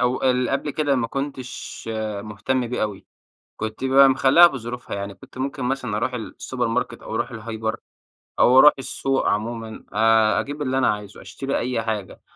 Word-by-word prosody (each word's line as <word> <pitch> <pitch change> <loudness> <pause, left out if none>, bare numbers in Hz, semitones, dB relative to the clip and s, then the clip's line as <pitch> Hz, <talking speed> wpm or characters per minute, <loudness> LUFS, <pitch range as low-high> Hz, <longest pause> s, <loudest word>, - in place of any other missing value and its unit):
أو 125 0 +1
اللي 125 -1 +2
قبل 140 +2 -1
كده 145 -1 +1
ما 125 -3 0
كنتش 135 0 -6 0.4
مهتم 110 +5 -2
بيه 125 0 -2
أوي، 105 -2 -4 0.5
كنت 110 +3 -5
بقى 135 +1 +6
مخليها 135 +6 +7
بظروفها 125 -6 -6
يعني، 100 0 -5
كنت 95 - -15
ممكن 135 0 -3
مثلًا 125 -4 -1
أروح 115 +4 -1
السوبر 125 +1 -4
ماركت 120 +1 -2
أو - - -6
أروح - - -2
الهايبر 110 0 -4 0.6
أو 130 +1 +6
أروح 150 +2 +9
السوق 135 0 -1
عمومًا، 110 +1 -3
آآ، 110 0 +4
أجيب 145 +1 -5
اللي 130 -1 0
أنا 130 - +3
عايزه، 105 -1 -10
أشتري 135 0 -3
أي 120 -2 -1
حاجة 110 -4 -4
125 Hz, 170 wpm, -23 LUFS, 110-135 Hz, 0.6 s, أروح